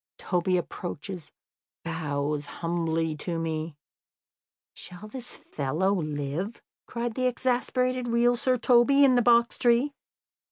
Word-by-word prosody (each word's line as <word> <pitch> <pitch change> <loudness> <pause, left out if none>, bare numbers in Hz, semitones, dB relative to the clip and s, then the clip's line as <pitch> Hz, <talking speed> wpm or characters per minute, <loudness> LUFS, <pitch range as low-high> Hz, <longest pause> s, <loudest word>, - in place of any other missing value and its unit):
Toby 180 0 0
approaches, 175 0 -6 0.5
bows 150 -3 -2
humbly 165 -2 -1
to 170 +2 -3
me 160 -1 -3 0.5
" - - -90
"Shall 180 +4 -8
this 245 +2 -5
fellow 155 +8 -1
live?" 155 +4 -3 0.3
cried 235 -1 -3
the 255 +2 +1
exasperated 255 0 0
real 240 +1 +3
Sir 255 +1 +1
Toby 250 +4 +5
in 265 - +5
the 245 - +4
box 235 0 +4
tree. 245 +4 +3
190 Hz, 120 wpm, -27 LUFS, 160-245 Hz, 0.5 s, Toby